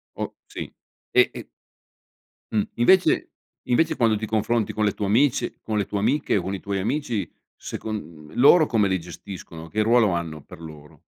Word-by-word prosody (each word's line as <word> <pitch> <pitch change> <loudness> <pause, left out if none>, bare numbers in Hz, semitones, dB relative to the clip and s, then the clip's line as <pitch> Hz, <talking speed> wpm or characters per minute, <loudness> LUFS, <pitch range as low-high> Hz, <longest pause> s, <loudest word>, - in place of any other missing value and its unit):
Oh - - -5
sì, - - -8 0.4
e - - +5
e - - -9 1.0
Mh, 110 - +2
invece 185 +10 +4 0.4
invece 160 +6 +2
quando 115 -3 +3
ti 110 +1 -3
confronti 110 +1 0
con 110 - 0
le 105 - +1
tue 105 - -3
amici 120 +7 +2
con 110 -1 -2
le 100 - +1
tue 100 - -3
amiche 130 +4 +1
o - - 0
con 95 +3 -4
i 95 - -5
tuoi 100 -1 -2
amici, 115 - -2 0.3
secon 80 -8 -7
loro 155 +6 +7
come 110 -7 +2
li 95 -1 0
gestiscono, 85 -1 -9
che 110 +6 -1
ruolo 110 -1 +4
hanno, 85 -3 -3
per 80 - -13
loro? 75 -2 -12
105 Hz, 180 wpm, -24 LUFS, 90-120 Hz, 1.0 s, loro